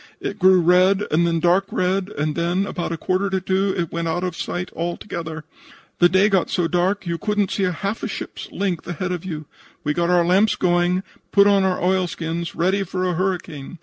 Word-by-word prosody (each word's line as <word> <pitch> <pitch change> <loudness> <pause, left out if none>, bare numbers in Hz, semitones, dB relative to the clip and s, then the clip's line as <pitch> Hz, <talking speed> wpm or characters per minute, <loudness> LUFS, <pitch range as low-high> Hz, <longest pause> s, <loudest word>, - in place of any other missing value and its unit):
It 205 - -5
grew 185 -1 +6
red 185 +3 +4
and 170 +3 +3
then 165 -1 +1
dark 180 +3 +3
red 185 +1 0
and 150 -5 -2
then, 175 +3 0
about 175 -4 -4
a 165 - -2
quarter 185 +4 0
after 190 -1 0
2, 190 +1 0
it 170 -3 -2
went 170 0 -2
out 175 +2 -1
of 180 -2 -2
sight 180 +1 -4
altogether. 170 -2 -4 0.6
The 175 - +6
day 190 +3 +4
got 195 -4 +1
so 175 -2 +1
dark 185 +4 +1
that - - -12
you 170 -1 -2
couldn't 210 -2 0
see 195 - 0
half 195 +4 -2
a - - -2
ship's - - -7
length 185 -5 -2
ahead 175 +1 -3
of 180 -2 -3
you. 155 -4 -5 0.4
We 150 - 0
got 170 +2 0
our 175 -1 +4
lamps 195 +5 +3
going, 175 -1 +2
and 185 +1 -1 0.3
put 200 -1 +6
on 200 -1 +4
our 190 -1 +1
oilskins, 170 -2 -1
ready 190 +4 +1
for 185 -1 -2
a 180 - 0
hurricane. 175 -4 -3
180 Hz, 215 wpm, -22 LUFS, 170-190 Hz, 0.6 s, grew